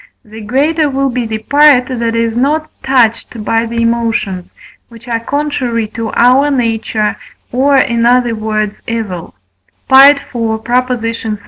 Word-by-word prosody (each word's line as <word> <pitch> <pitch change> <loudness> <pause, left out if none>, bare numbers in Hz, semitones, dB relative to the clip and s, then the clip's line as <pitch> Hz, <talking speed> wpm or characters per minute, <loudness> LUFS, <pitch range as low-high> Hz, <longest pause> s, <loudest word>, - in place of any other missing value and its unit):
the 220 +1 -11
greater 290 +8 0
will 275 0 -1
be 245 -1 -3
the 220 0 -3
part 285 +2 +4
that 235 -3 -2
is 230 -1 -1
not 300 +5 0
touched 235 -3 0
by 225 0 0
the 230 +1 -4
emotions, 225 -6 -2 0.4
which 235 0 -15
are 230 -1 -1
contrary 250 -4 -2
to 225 0 -5
our 255 +4 +3
nature, 225 -4 -1 0.4
or 275 +3 +2
in 235 -3 +1
other 240 0 +3
words, 215 -1 -3
evil 215 -7 -5 0.6
(IV. 275 +2 +8 0.2
xxx.). 230 -1 -2
235 Hz, 135 wpm, -13 LUFS, 225-260 Hz, 0.6 s, IV